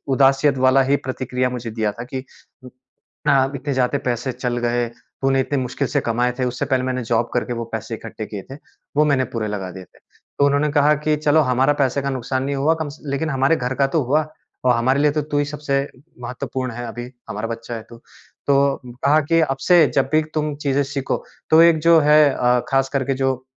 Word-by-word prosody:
उदासियत 135 +1 +3
वाला 130 +1 +5
ही 135 +2 +2
प्रतिक्रिया 125 -1 -2
मुझे 125 -2 -5
दिया 110 -2 -1
था 120 - -7
कि 130 +1 -5 1.1
अ, 135 -1 +3
"इतने 140 +1 -3
ज़्यादे 130 +2 +1
पैसे 120 +1 -1
चल 125 0 -3
गए, 120 0 +1
तूने 135 +3 -2
इतने 140 +2 -2
मुश्किल 130 +2 -2
से - - 0
कमाए 120 +2 0
थे।" 130 - +1
उससे 125 0 -2
पहले 130 -2 0
मैंने 130 -1 -2
जॉब 115 0 0
करके 125 - -1
वो 115 - -3
पैसे 110 +1 -4
इकट्ठे 110 -1 -7
किए 105 -2 -7
थे, - - -6 0.4
वो 150 - +5
मैंने 140 -3 +2
पूरे 115 -2 -2
लगा 95 -3 -4
दिए 95 +1 -9
थे। - - -27 0.4
तो 140 - +5
उन्होंने 145 +1 +2
कहा 150 0 +4
कि, 150 +1 0
"चलो, 150 +1 +2
हमारा 130 +3 +3
पैसे 135 +1 +1
का 140 - -1
नुकसान 130 0 -2
नहीं 140 +1 -2
हुआ 140 +4 +2
कम 150 - -3
स 145 - -11
लेकिन 140 +3 -2
हमारे 135 +3 +2
घर 125 -3 -2
का 135 0 +2
तो 160 - +3
हुआ 150 +5 +1 0.4
और 125 - +4
हमारे 130 +4 +2
लिए 150 0 +4
तो 150 +1 -1
तू 145 - +2
ही 145 - +1
सबसे 145 -1 -1 0.4
महत्वपूर्ण 125 +1 -4
है 120 +1 -6
अभी। 120 +2 -7 0.2
हमारा 105 +2 -3
बच्चा 115 +1 -6
है 115 - -6
तू।" 115 - -12 0.5
तो 140 0 +2 0.2
कहा 150 +2 +5
कि, 165 +3 +2
"अब 135 -4 0
से 175 -3 +7
जब 135 - +2
भी 155 - +5
तुम 150 -1 -1
चीज़ें 140 +1 +2
सीखो, 135 -2 -2 0.3
तो 160 +1 +7
एक 170 -2 +5
जो 165 -1 +7
है 150 - +7
अ, 125 0 +2
खासकर 135 0 +1
के 135 - 0
जो 130 -1 -1
135 Hz, 220 wpm, -21 LUFS, 120-145 Hz, 1.1 s, से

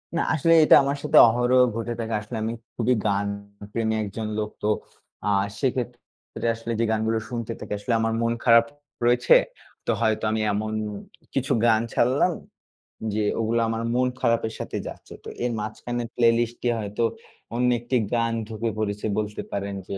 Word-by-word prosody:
না, 170 - +2
আসলে 165 +2 +3
এটা - - +8
আমার 140 +1 -1
সাথে 150 +1 +3
অহরহ 120 +2 +3 0.2
ঘটে 115 +1 -3
থাকে। 115 0 -3
আসলে 110 +2 -6
আমি 115 +1 -2 0.2
খুবই 120 +2 +2
গান 100 0 +1 0.4
প্রেমী 110 -1 0
একজন 105 +2 -5
লোক। 105 -1 -1
তো 105 - +2 0.6
আ - - +2 0.3
সেক্ষেত্রে 125 -3 -4
আসলে 115 +1 -6
যে 115 - +3
গানগুলো 110 +1 +1
শুনতে 115 -2 -4
থাকি, - - -9
আসলে 115 +4 -1
আমার 115 0 0
মন 115 0 +1
খারাপ 115 -1 +7 0.4
রয়েছে। 120 +1 +5 0.5
তো - - +1
হয়তো 110 -1 +1
আমি 110 0 0
এমন 110 +1 -2 0.6
কিছু - - -1
গান 110 -1 +4
ছাড়লাম 130 +9 +3 0.8
যে 110 - 0 0.2
ওগুলো 115 +1 +1
আমার 115 0 -2
মন 125 0 +3
খারাপের 115 -2 +1
সাথে - - -4
যাচ্ছে। - - -10
তো - - -10 0.2
এর 125 - 0
মাঝখানের 120 +3 -4
প্লেলিস্ট 120 0 +2
এ - - +3
হয়তো 105 +2 -2 0.5
অন্য 125 +1 +2
একটি 120 +2 -3 0.2
গান 115 0 +1
ঢুকে 115 +1 -3
পড়েছে 105 -1 -2
বলতে 105 -1 -2
পারেন 100 0 -3
যে, 100 - -3
115 Hz, 170 wpm, -25 LUFS, 110-120 Hz, 0.8 s, এটা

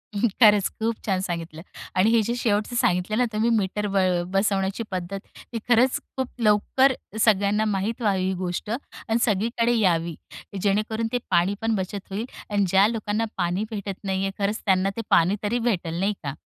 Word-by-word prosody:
खरंच, 210 -1 +4
खूप 225 +1 0
छान 190 -3 +1
सांगितलं 165 -3 -5 0.4
आणि 200 +4 +4
हे 230 -1 +4
जे 235 +3 -1
शेवटचं 220 0 0
सांगितलं 190 -2 +1
ना 250 - +3
तुम्ही 220 +2 +1
मीटर 205 +1 -1
ब 195 - +2 0.3
बसवण्याची 195 +2 0
पद्धत, 185 +1 -4 0.3
ती - - -1
खरंच 245 +2 +4 0.2
खूप 260 -1 -1
लवकर 230 +5 +3 0.3
सगळ्यांना 210 0 +3
माहीत 210 +3 -1
व्हावी 195 -4 +1
ही 190 - 0
गोष्ट 180 +2 -4
आणि 230 -2 -3
सगळीकडे 230 +3 +1
यावी. 170 -5 +1 0.2
की 200 - -10
जेणेकरून 215 +3 0
ते - - +3
पाणी 175 +2 +3
पण 225 0 +1
बचत 195 +1 -3
होईल 205 +4 -3 0.2
आणि 205 -1 +1
ज्या 195 +3 +5
लोकांना 220 -1 -1
पाणी 175 +3 0
भेटत 200 -2 -5
नाही 190 -1 -1
आहे 195 - -1
खरंच 210 +2 0
त्यांना 190 -1 +3
ते - - -1
पाणी 175 +5 +4
तरी 235 +4 0
भेटेल, 175 -8 -1
नाही 200 +2 +1
का. 140 0 -4
205 Hz, 180 wpm, -24 LUFS, 190-225 Hz, 0.4 s, ज्या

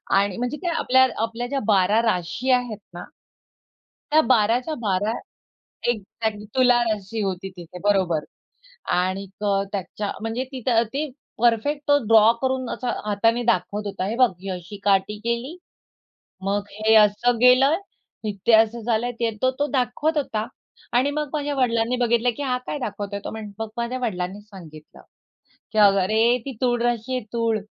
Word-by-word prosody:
आणि 200 0 +2
म्हणजे 245 +5 -2
काय 350 -2 -2
आपल्या 260 +1 +4 0.2
आपल्या 230 +2 -3
ज्या 275 +1 -1
12 205 +2 +4
राशी 225 +4 -1
आहेत 245 -4 +1 0.2
ना 175 - -7 1.1
त्या 310 - +6
12 230 -1 +4
च्या 310 +5 -5
12, 205 0 0 0.8
एक 220 -3 -1 0.2
त्यात 220 -2 -1 0.2
तुला 250 -1 +5
राशी 215 -1 -2
होती 195 0 -3
तिथे 175 +1 -10
बरोबर. 185 -6 +2 0.7
आणिक 190 +3 -2 0.3
त्याच्या 200 +1 -4
म्हणजे 225 +3 -2
तिथं 245 -3 +1
ते 295 +1 -2 0.3
परफेक्ट 240 +6 +2
तो 285 0 +5
ड्रॉ 225 0 +7
करून 260 -1 -1
असा 250 - -3 0.2
हाताने 225 +4 +1
दाखवत 210 -3 0
होता. 190 -1 -3
हे 225 - -2
बघ 250 -2 +5
ही 195 - -6
अशी 180 +2 -6
काटी 200 +1 +2
केली. 235 +8 -3 0.9
मग 200 +1 +1
हे 220 +2 +2
असं 215 +3 +4
गेलं, 260 +5 +5 0.7
ते 230 - +6
असं 225 +1 +4
झालं. 235 +1 0
ते 230 -1 +1
तो, 255 0 +3
तो 290 - +1
दाखवत 280 +4 0
होता 220 -6 -1 0.5
आणि 260 +4 +3
मग 300 -1 -2
माझ्या 290 -1 -2
वडिलांनी 235 -1 +1
बघितलं 235 +1 +2
की 290 - -3
हा 250 -2 0
काय 295 - -2
दाखवतोय. 205 -3 -4
तो - - -4
मग 215 +1 -6
माझ्या 240 +2 -2
वडिलांनी 195 -3 -3
सांगितलं, 170 -7 -14 0.7
की 215 - -1
अरे 215 +4 +4
ती 270 - -4
तूळ 240 -1 +2
राशी 240 +1 -1
आहे 245 - -4
तूळ. 230 -2 +1
225 Hz, 160 wpm, -23 LUFS, 205-250 Hz, 1.1 s, ड्रॉ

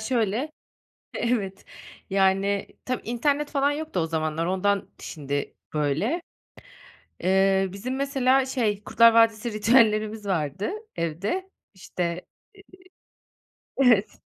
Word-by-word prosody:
şöyle, 235 +4 -1 0.6
evet, 205 -5 -2 0.5
yani, 195 +1 +2 0.2
tabii 255 0 -3
internet 285 +5 0
falan 280 0 +2
yoktu 300 - -3
o 165 - 0
zamanlar 160 0 -1
ondan 195 +2 0
şimdi 145 -2 -4 0.2
böyle. 155 - 0 1.0
Eee, 190 +1 +3
bizim 250 +7 -4
mesela 270 -1 +2
şey, 225 -6 -1
Kurtlar 230 0 +6
Vadisi 225 0 +3
ritüellerimiz 215 -1 +3
vardı 170 0 -1 0.3
evde, 195 - -2 0.2
işte, 185 -1 -4 1.8
eee, 270 - +4
evet. 215 -5 +2
210 Hz, 100 wpm, -25 LUFS, 190-255 Hz, 1.8 s, Kurtlar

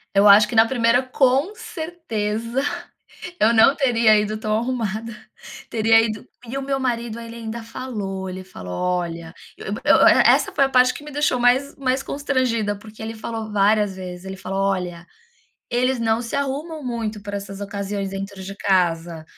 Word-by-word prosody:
Eu 200 +1 +6
acho 210 +1 +8
que 235 - -5
na 225 +1 +7
primeira, 240 0 +2
com 265 +8 +2
certeza, 235 - -3 0.8
eu 225 +2 +4
não 235 +5 +6
teria 235 -6 +4
ido 210 +1 -1
tão 215 0 -1
arrumada, 230 -2 -3 0.5
teria 225 0 +4
ido 215 -2 -3 0.2
e 265 +4 -4
o - - -2
meu 270 0 -2
marido 235 -3 -2
ele 230 0 -9
ainda 230 0 -6
falou, 205 -6 -5
ele 185 0 -7
falou: 90 - -9
"Olha", 170 - -2 0.2
e - - -10
o - - -10
e 205 +3 0
o - - +6
essa - - +5
foi 275 - +2
a - - -2
parte 255 -1 +4
que 290 - -10
me 300 - -9
deixou 285 -3 +1
mais 255 +4 +2
mais 265 -1 0
constrangida, 255 -8 -1
porque 215 +1 -13
ele 225 +1 -5
falou 220 -1 -5
várias 205 -1 +2
vezes, 180 0 -8
ele 190 0 -6
falou: 195 +1 -4
"Olha, 180 -3 -2 0.7
eles 250 +1 +1
não 225 0 +1
se 235 +1 -6
arrumam 285 +3 -3
muito 225 -4 -4
pra 205 0 -5
essas 200 0 -7
ocasiões 200 -1 -4
dentro 195 0 -6
de 195 +1 -8
casa, 170 -4 0
220 Hz, 180 wpm, -22 LUFS, 195-255 Hz, 0.8 s, acho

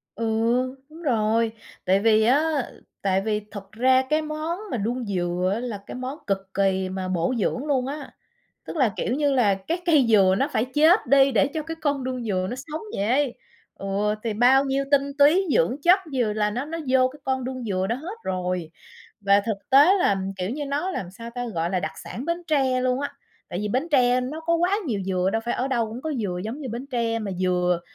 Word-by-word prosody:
Ừ, 230 +2 -3 0.6
đúng 325 +2 -13
rồi. 225 -4 +1 0.3
Tại 190 +2 +3
vì 220 0 +4
á, 265 +6 +4 0.6
tại 195 -1 +1
vì 210 0 -1
thật 200 -1 -9
ra 255 +3 +3
cái 310 +1 +2
món 310 +4 -4
mà 245 - -1
đuông 235 +4 -2
dừa 180 -1 -1
á 225 - -2
là 240 -4 -4
cái - - -7
món 255 +4 -5
cực 195 -1 -2
kỳ 190 -1 +1
mà 185 0 -4
bổ 180 +5 0
dưỡng 255 +8 -1
luôn 265 -3 0
á. 285 0 -6 0.6
Tức - - -6
là, 250 -8 +2
kiểu 240 - -1
như 290 -1 +1
là, 220 -7 +3
cái 330 - -4
cây 295 -7 +5
dừa 195 -4 +5
nó - - +1
phải 220 - +1
chết 320 +7 +5
đi 275 -1 +5
để 270 - +4
cho 310 - -1
cái 325 +1 -5
con 285 -3 -1
đuông 255 -2 -3
dừa 185 -3 -1
nó 250 - -4
sống 300 +4 -6 0.2
dậy. 245 +6 +1 0.4
Ừ. 200 +2 -1
Thì 225 -3 -2
bao 260 +5 +5
nhiêu 275 0 0
tinh 280 0 +2
túy, 335 +7 +5
dưỡng 180 +11 +2
chất 360 +3 +6
dừa 240 -5 +1
là 210 0 0
nó 250 +6 -3
nó 330 +2 -5
vô 255 0 +4
cái 295 - -15
con 260 -1 -1
đuông 255 -1 -5
dừa 190 -3 -1
đó 235 - 0
hết 355 +10 -7
rồi. 180 -3 -2 0.5
Và 200 0 +4
thực 215 -3 -1
tế 290 +8 +7
là, 200 - +3 0.2
kiểu 185 +2 -3
như 290 +3 -3
nó 295 +7 -1
làm 180 - -4
sao 230 +4 -9
ta? 245 0 -4
Gọi 165 +1 -1
là 185 -2 0
đặc 155 - -3
sản 250 - -6
Bến 340 +1 -2
Tre 265 -5 +2
luôn 255 +1 0
á. 285 - -3 0.4
Tại 175 - -4
vì 210 0 -2
Bến 265 +10 -1
Tre 250 -2 +4
nó 290 +6 -5
có 335 +1 +1
quá 355 +4 +2
nhiều 210 -6 -1
dừa, 185 0 +1
đâu 225 - +1
phải 240 - -1
ở 260 +2 -1
đâu 235 -4 0
cũng 230 +4 -8
có 315 -1 -2
dừa 200 -8 -2
giống 240 +7 -5
như 265 - -5
Bến 240 +4 -5
Tre. 230 -2 0
Mà 210 -3 -4
dừa 180 -1 +1
245 Hz, 230 wpm, -24 LUFS, 200-280 Hz, 0.6 s, tế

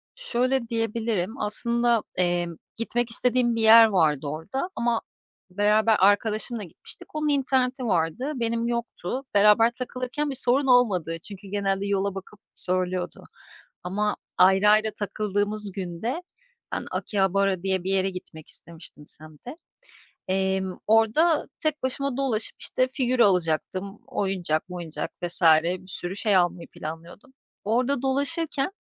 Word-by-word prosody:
Şöyle 255 - -1
diyebilirim, 225 -1 -2
aslında, 235 +2 +1
emm, 175 -1 0 0.2
gitmek 235 +1 -1
istediğim 245 0 +1
bir 225 - -1
yer 225 +1 +9
vardı 155 -9 +2
orada 165 - -4
ama 235 -1 0 0.5
beraber 210 +3 +3
arkadaşımla 215 +3 +2
gitmiştik, 180 - -13
onun 305 0 0
interneti 260 -2 +1
vardı. 190 - 0
Benim 230 -1 -1
yoktu. 235 0 -3
Beraber 210 +3 +6
takılırken 255 +4 -4
bir 275 - -3
sorun 265 +2 +2
olmadı 190 -10 +3
çünkü 200 -1 -10
genelde 195 0 -1
yola 200 -1 0
bakıp 195 +2 -9 0.2
söylüyordu 185 0 -2 0.6
ama 210 +4 -1 0.2
ayrı 195 +2 +5
ayrı 215 +1 +4
takıldığımız 205 0 -2
günde 195 - -4 0.5
ben - - -3
Akihabara 195 -2 0
diye 190 -2 0
bir 190 - -2
yere 195 0 +1
gitmek 160 -4 -10
istemiştim 160 -3 -12
semte. 155 - -11 0.7
Emm, 190 0 -1
orada 225 +10 +3
tek 305 -2 -1
başıma 270 0 -2
dolaşıp, 250 -6 -1
işte, 255 0 0
figür 255 -1 -1
alacaktım, 185 0 +1
oyuncak 185 -5 -1
moyuncak 170 -4 -5
vs. 175 +1 -2 0.2
bir 185 +2 -3
sürü 180 0 -3
şey 205 0 +1
almayı 175 -1 0
planlıyordum. 165 - -9 0.3
Orada 245 +5 +1
dolaşırken 285 +3 -1
210 Hz, 125 wpm, -25 LUFS, 185-245 Hz, 0.7 s, yer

